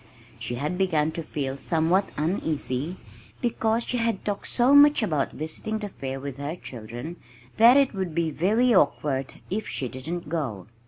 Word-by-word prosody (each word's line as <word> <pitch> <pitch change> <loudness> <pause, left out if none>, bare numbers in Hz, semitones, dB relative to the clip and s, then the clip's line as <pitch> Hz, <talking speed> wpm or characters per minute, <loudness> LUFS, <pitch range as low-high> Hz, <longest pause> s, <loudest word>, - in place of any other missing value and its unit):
She 115 +1 -3
had 150 +9 -2
begun 160 -5 +2
to 165 - -4
feel 140 -4 -3
somewhat 170 +6 +1
uneasy, 155 -2 -1 0.4
because 230 -1 0
she 250 - -2
had 230 -4 -1
talked 205 -1 -2
so 250 +3 +3
much 285 -3 +7
about 155 -9 0
visiting 160 +8 -4
the 210 -1 -5
fair 135 -6 -5
with 140 -1 -6
her 145 +3 -4
children 120 +4 -8 0.4
that 235 +4 +8
it 275 -3 +3
would 190 -5 -3
be 165 -2 +1
very 220 - +3
awkward 135 -8 +1 0.2
if 210 +2 -2
she 130 - -2
didn't 150 +7 -5
go. 135 - -3
165 Hz, 165 wpm, -26 LUFS, 140-215 Hz, 0.4 s, that